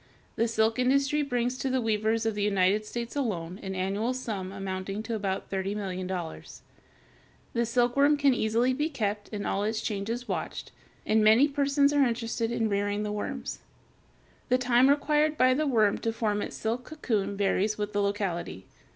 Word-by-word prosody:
The 230 - +1
silk 225 +1 +1
industry 275 +3 +2
brings 245 -2 -1
to 270 - -1
the 260 0 +1
weavers 220 0 0
of 225 - +1
the 205 - -3
United 200 +1 +2
States 235 +2 -5
alone 190 -9 -2
an 190 -1 -5
annual 200 +7 -1
sum 205 -7 -4
amounting 195 +1 -4
to 230 +1 -4
about 195 -3 -3
$30,000,000. 190 -3 -4 0.9
The 235 0 +1
silkworm 250 +5 +3
can 280 -2 +4
easily 235 +2 +1
be 295 +4 -1
kept 210 -7 -3
and 205 -2 -4
all 200 - 0
its 215 +1 -1
changes 225 +4 -3
watched, - - -4 0.3
and 220 0 +3
many 220 +7 +6
persons 280 0 +2
are 290 -1 +4
interested 230 -2 -1
in 225 -1 0
rearing 205 0 -1
the 210 - -3
worms. 210 0 -4 0.9
The 250 - +4
time 255 +1 +4
required 300 +1 +2
by 255 0 +5
the 300 +3 0
worm 220 -6 +3
to 225 - -1
form 215 -2 -1
its - - -5
silk 230 +3 -2
cocoon 215 -10 -2
varies 205 +1 +1
with 210 0 -3
the 205 - +1
locality. 185 - -2
220 Hz, 170 wpm, -28 LUFS, 200-255 Hz, 0.9 s, many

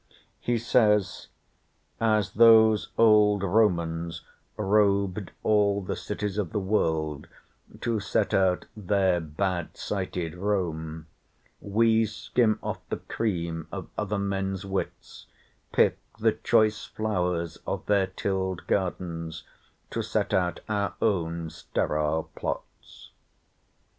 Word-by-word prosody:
He 120 -1 0
says: 105 -4 +2 0.7
"As 110 -3 +1
those 110 -1 +6
old 105 -3 +5
Romans 85 -5 +1 0.3
rob'd 100 -1 +2
all 100 -2 +3
the - - -3
cities 105 0 -3
of 95 -5 -2
the 105 - +1
world, 80 -7 0 0.5
to 115 -2 0
set 105 +1 0
out 95 -2 +2
their 95 -3 +1
bad 85 +2 -3
sited 90 -4 -3
Rome, 85 -5 -2 0.5
we 110 +2 +2
skim 110 +1 +1
off - - -3
the - - -2
cream 85 -7 -3
of - - -6
other 105 -1 -2
men's 95 -1 -2
wits, 95 -1 -5 0.4
pick - - +3 0.2
the - - +3
choice 110 -2 +2
flowers 90 -6 -2
of - - -3
their 100 -2 +2
till'd 95 -1 -2
gardens 85 -4 -2 0.5
to - - -1
set - - -1
out 90 -1 +1
our 100 -2 -1
own 85 -6 0
steril 75 +1 -1
plots." - - -7
95 Hz, 110 wpm, -27 LUFS, 85-105 Hz, 0.7 s, those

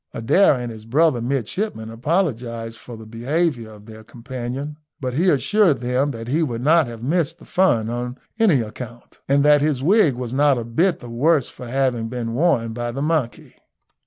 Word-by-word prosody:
Adair 145 - +4
and 120 -2 -4
his 110 -1 -11
brother 140 +1 +2
midshipmen 120 - -3
apologised 115 - -2
for 120 -2 -10
the 110 - -11
behaviour 120 +2 -1
of 105 -1 -14
their 110 0 -12
companion, 130 +5 -6 0.2
but 130 -2 -3
he 175 +8 +2
assured 180 +2 +3
them 125 +3 0
that 115 -4 -6
he 150 +7 +1
would 120 -6 -2
not 160 0 +4
have 115 -1 -9
missed 165 +3 0
the 165 - -16
fun 120 -13 +2
on 120 +2 -4 0.2
any 185 - +4
account, 120 +2 -9
and 140 +1 +3
that 150 -1 +6
his 145 -3 0
wig 175 - +4
was 125 -1 -5
not 140 0 +3
a 115 - -4
bit 165 +9 +1
the 120 - -9
worse 140 +4 +2
for 125 - -10
having 125 -3 0
been 115 -1 -4
worn 120 -6 +1
by 120 +1 -3
the 135 +4 -4
monkey. 155 -6 -2
125 Hz, 190 wpm, -21 LUFS, 115-150 Hz, 0.2 s, that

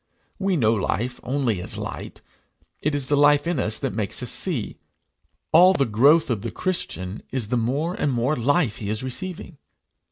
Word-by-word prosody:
We 195 -2 +1
know 110 -5 +3
life 120 +4 -2
only 125 -7 -1
as - - -5
light; - - -7 0.6
it 150 0 0
is 140 -2 -1
the 145 - +1
life 145 +1 +4
in 170 -4 -1
us 110 -3 0
that - - -3
makes 105 -2 -2
us - - -2
see. - - -2 0.7
All 185 +2 +7
the 140 -7 +2
growth 140 +8 +4
of 110 -4 -1
the 115 - -4
Christian 105 - -3
is 125 -5 -3
the 125 - 0
more 135 +9 0
and 145 - -1
more 125 +4 0
life 140 0 +1
he 100 - -5
is 110 +3 -2
receiving. 165 +4 -5
130 Hz, 185 wpm, -23 LUFS, 115-155 Hz, 0.7 s, All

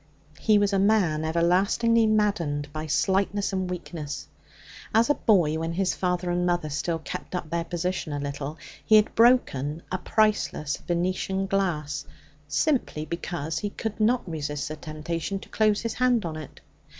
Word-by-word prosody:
He 215 -1 +4
was 205 0 +2
a 195 - +3
man 190 -7 +3
everlastingly 195 +8 +3
maddened 170 -10 0
by 155 0 -4
slightness 195 +5 +1
and 185 -1 -1
weakness. 165 -4 -5 0.7
As 230 +5 +5
a - - +5
boy, 175 - +2
when 165 +1 -2
his 190 +1 +1
father 180 -1 -1
and 175 0 0
mother 175 -3 0
still 165 +4 -1
kept 160 +3 -6
up 170 -3 -4
their 170 0 0
position 175 -1 -2
a 145 - -2
little, 140 +1 -4 0.3
he 215 - +5
had 215 0 +5
broken 165 - +3
a 185 - -1
priceless 210 -9 +1
Venetian 185 +2 -1
glass 180 -7 -1 0.4
simply 155 - 0
because 165 -1 -3
he 205 - -2
could 220 +1 -5
not 230 +1 +2
resist 150 -3 -3
the 155 - -4
temptation 160 +4 -4
to - - -11
close 215 -1 +2
his 230 -1 -2
hand 245 -4 +2
on 160 -2 -4
it. 155 -3 -9
175 Hz, 160 wpm, -26 LUFS, 155-205 Hz, 0.7 s, As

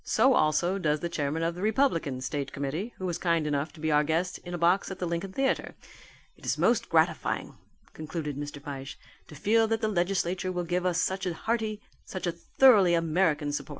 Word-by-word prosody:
So 265 - +4
also 175 +2 +2
does 150 -4 0
the 170 - -2
chairman 155 0 -2
of 165 +1 0
the 180 - -8
Republican 205 - +1
State 140 +2 -3
Committee, 150 - -3
who 185 - -5
was 175 -2 -2
kind 170 -3 +1
enough 145 0 -1
to 160 - -15
be 160 0 -1
our 150 0 +4
guest 165 +4 -1
in 175 0 -6
a - - -3
box 175 +3 +2
at 190 - -6
the 185 - -3
Lincoln 170 +3 -3
Theatre. 270 +6 -1 0.6
It - - -23
is - - -1
most - - +2
gratifying," - - +1 0.4
concluded 155 -2 -5
Mr. 145 +1 -6
Fyshe, 140 -2 -7 0.3
"to 150 - -12
feel 220 +9 +3
that 225 0 0
the 220 - +1
legislature 185 -1 0
will 180 -1 -2
give 180 +1 -1
us 180 -1 +1
such 190 +1 -1
a 175 - -2
hearty, 220 +1 -2 0.2
such 185 - -6
a 175 - +1
thoroughly 190 +1 +4
American 160 -3 +1
support." 145 - -4
170 Hz, 210 wpm, -28 LUFS, 150-190 Hz, 0.6 s, So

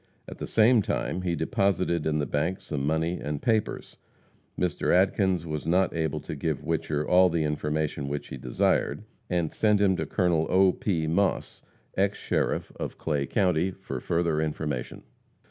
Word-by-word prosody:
At - - -9
the - - -4
same 115 +1 +5
time 100 -3 -2
he 90 -2 -1
deposited 90 -3 0
in 75 -1 +1
the 75 - 0
bank 75 +7 -1
some 70 -4 -4
money 80 +3 0
and 75 -1 -3
papers. 110 +2 -1 0.6
Mr. 90 -3 0
Adkins 95 -2 +2
was 75 -1 -4
not 90 +2 +2
able 80 -2 -1
to - - -6
give 75 0 -2
Whicher 75 -2 -1
all 90 0 +5
the 80 -2 0
information 75 -1 -2
which 70 +1 -4
he - - -6
desired, 60 - 0 0.3
and 85 -3 0
sent 105 -2 +3
him 100 -2 +3
to - - -3
Col. 85 -5 +1
O. 95 0 +5
P. 85 -6 -1
Moss, 95 +5 0 0.3
ex 100 +1 +1
sheriff - - -1
of - - -5
Clay 70 -4 -1
county, 90 -1 +2
for 95 -9 -6
further 85 +1 0
information. 75 -4 -3
85 Hz, 165 wpm, -27 LUFS, 75-95 Hz, 0.6 s, same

